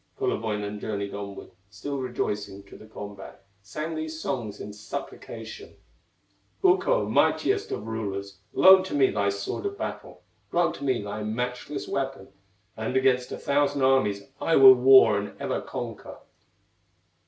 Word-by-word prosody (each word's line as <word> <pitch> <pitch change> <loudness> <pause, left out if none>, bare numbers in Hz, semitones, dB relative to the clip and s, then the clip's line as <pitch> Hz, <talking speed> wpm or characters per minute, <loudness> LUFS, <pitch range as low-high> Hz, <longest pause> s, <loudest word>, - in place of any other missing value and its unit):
Kullerwoinen 105 -2 -2
journeyed 100 -2 -4
onward, 100 -1 -7 0.2
Still 135 +8 -5
rejoicing, 105 -6 -3
to 100 - -15
the 110 - -13
combat, 100 -2 -10 0.2
Sang 155 +11 -5
these 155 0 -5
songs 120 -9 -4
in 105 - -7
supplication: 405 - -8 0.9
"Ukko, 390 +7 +3
mightiest 405 +1 +1
of 105 - -4
rulers, 100 -3 -5
Loan 190 0 +7
to 190 - -4
me 135 -2 +4
thy 100 0 +1
sword 100 - -3
of 400 0 -6
battle, - - -6 0.3
Grant 175 0 +1
to - - -9
me 130 -6 0
thy 105 +1 -5
matchless 125 +6 -4
weapon, 135 -7 -3 0.5
And 110 +4 -2
against 130 -1 +2
a - - -4
thousand 140 -1 +1
armies 105 -7 +2 0.2
I 165 - +2
will 135 -1 +10
war 125 -4 +6
and 105 - -8
ever - - -2
conquer." - - -7
120 Hz, 140 wpm, -26 LUFS, 105-140 Hz, 0.9 s, will